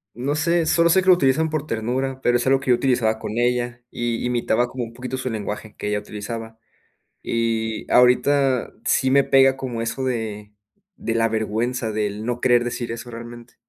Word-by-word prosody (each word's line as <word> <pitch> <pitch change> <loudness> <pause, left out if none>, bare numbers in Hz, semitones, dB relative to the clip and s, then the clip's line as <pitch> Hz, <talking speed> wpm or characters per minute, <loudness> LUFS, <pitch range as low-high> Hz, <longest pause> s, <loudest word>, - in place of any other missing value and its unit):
No 135 +5 -2
sé, 170 +2 +1
solo 170 +1 +3
sé 190 +3 +5
que - - -7
lo - - +10
utilizan 160 -1 +2
por 155 -1 -3
ternura, 130 +3 -2
pero, 120 -1 +3
es 120 - -2
algo 135 0 +4
que 135 -1 0
yo - - +6
utilizaba 120 -3 +1
con 110 +2 -5
ella. 120 0 0
Y 120 0 -2
imitaba 120 -1 +1
como 125 0 -5
un 115 - -8
poquito 125 +2 -5
su 130 0 -3
lenguaje 105 -1 -5
que 105 - -3
ella 105 0 0
utilizaba. 110 +2 -7 0.7
Y 115 -1 -2
ahorita 130 +1 +3
sí 130 - +2
me 140 +1 +5
pega 135 -1 +4
como 125 -4 -4
eso 125 +3 -3
de 110 -4 -4 0.4
de 115 - -3
la 115 0 +2
vergüenza 110 +2 -1
del 105 +1 -3
no 120 0 -2
querer 120 -2 +4
decir 120 -1 -4
eso 115 +1 -7
realmente. 120 0 -10
120 Hz, 195 wpm, -22 LUFS, 115-130 Hz, 0.7 s, lo